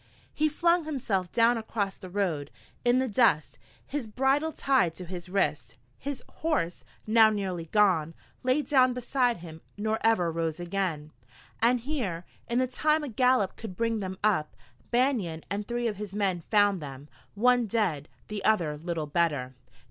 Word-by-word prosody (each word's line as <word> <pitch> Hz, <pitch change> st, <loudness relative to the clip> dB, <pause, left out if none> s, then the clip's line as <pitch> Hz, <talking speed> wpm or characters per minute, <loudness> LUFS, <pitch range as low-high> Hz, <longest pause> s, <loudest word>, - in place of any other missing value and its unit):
He 310 Hz, 0 st, +2 dB
flung 340 Hz, +2 st, +2 dB
himself 215 Hz, -, -2 dB
down 230 Hz, 0 st, +3 dB
across 205 Hz, -3 st, -2 dB
the 185 Hz, -, -9 dB
road, 175 Hz, -7 st, -1 dB, 0.3 s
in 245 Hz, +1 st, +4 dB
the 260 Hz, 0 st, +1 dB
dust, 215 Hz, -9 st, +2 dB, 0.3 s
his 280 Hz, -5 st, -4 dB
bridle 270 Hz, +7 st, +1 dB
tied 260 Hz, -, +2 dB
to 180 Hz, -, -7 dB
his 180 Hz, 0 st, -7 dB
wrist. 195 Hz, +2 st, -1 dB, 0.2 s
His 280 Hz, -2 st, -5 dB
horse, 295 Hz, -, -1 dB, 0.2 s
now 220 Hz, 0 st, +6 dB
nearly 190 Hz, -5 st, -3 dB
gone, 165 Hz, -4 st, +2 dB, 0.3 s
lay 255 Hz, +4 st, +2 dB
down 255 Hz, -3 st, +4 dB
beside 250 Hz, 0 st, +1 dB
him, 160 Hz, -1 st, -10 dB, 0.2 s
nor 220 Hz, +1 st, -1 dB
ever 200 Hz, -7 st, +3 dB
rose 165 Hz, 0 st, -2 dB
again. 175 Hz, -4 st, -2 dB, 0.5 s
And 240 Hz, +1 st, +3 dB
here, 225 Hz, -, -3 dB, 0.2 s
in 235 Hz, -, 0 dB
the 255 Hz, -, +3 dB
time 305 Hz, +5 st, +1 dB
a 290 Hz, -, -4 dB
gallop 250 Hz, -4 st, +2 dB
could 190 Hz, -5 st, -8 dB
bring 230 Hz, -1 st, 0 dB
them 190 Hz, -2 st, -5 dB
up, 190 Hz, -8 st, +1 dB, 0.3 s
Banion 235 Hz, -, +1 dB
and 205 Hz, +1 st, -2 dB
three 240 Hz, 0 st, -2 dB
of 210 Hz, -3 st, -3 dB
his 205 Hz, -1 st, -6 dB
men 190 Hz, -4 st, 0 dB
found 205 Hz, -4 st, +3 dB
them, 140 Hz, 0 st, -8 dB, 0.3 s
one 245 Hz, +2 st, +3 dB
dead, 190 Hz, -10 st, -1 dB, 0.2 s
the 210 Hz, -1 st, -5 dB
other 170 Hz, -9 st, +2 dB
little 165 Hz, -1 st, -3 dB
better. 145 Hz, -5 st, 0 dB
210 Hz, 165 wpm, -28 LUFS, 175-250 Hz, 0.5 s, now